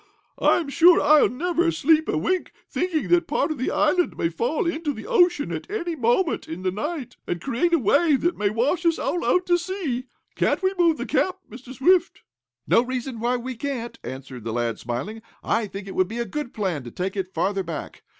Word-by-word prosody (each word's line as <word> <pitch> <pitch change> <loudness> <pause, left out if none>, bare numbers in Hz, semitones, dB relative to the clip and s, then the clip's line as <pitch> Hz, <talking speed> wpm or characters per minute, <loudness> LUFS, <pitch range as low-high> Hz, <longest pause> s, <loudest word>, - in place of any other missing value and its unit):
I'm 325 -5 +2
sure 340 +4 +6
I'll 305 -1 +5
never 340 +5 0
sleep 315 0 +2
a - - +1
wink, 360 - -1
thinking 350 -4 -1
that 350 0 +3
part - - 0
of 310 - -4
the 255 - 0
island 340 +4 +1
may 165 - 0
fall 240 - -1
into 325 -3 -1
the - - -9
ocean 355 -10 +3
at - - -5
any 350 -5 -3
moment 270 +7 +1
in 165 +3 -7
the 185 - +1
night, 290 - -5
and 175 - -2
create 275 - 0
a 340 - +5
wave 285 - +3
that 345 +1 +1
may 205 -1 0
wash 255 - 0
us 335 -1 +2
all 350 - -1
out 360 0 +2
to 350 0 +3
sea. 335 -9 -3 0.3
Can't - - 0
we 375 +1 +2
move 340 -3 +3
the - - -4
camp, 370 0 0
Mr. 245 +3 -11
Swift?" 345 +7 +2 0.4
"No - - +4
reason 255 -1 -4
why 245 +2 +1
we 255 +1 -5
can't," 240 -2 -5
answered 130 -2 -8
the 115 0 -4
lad, 120 -1 -1
smiling. 135 - -5 0.2
"I 225 -1 0
think 195 0 -8
it 190 - -6
would 185 - +2
be 225 +4 -6
a 235 - -1
good 255 +4 -5
plan 185 - -2
to - - -6
take 185 - -4
it 190 -2 -3
farther 195 +1 0
back. 165 -5 -7
265 Hz, 215 wpm, -24 LUFS, 205-340 Hz, 0.4 s, sure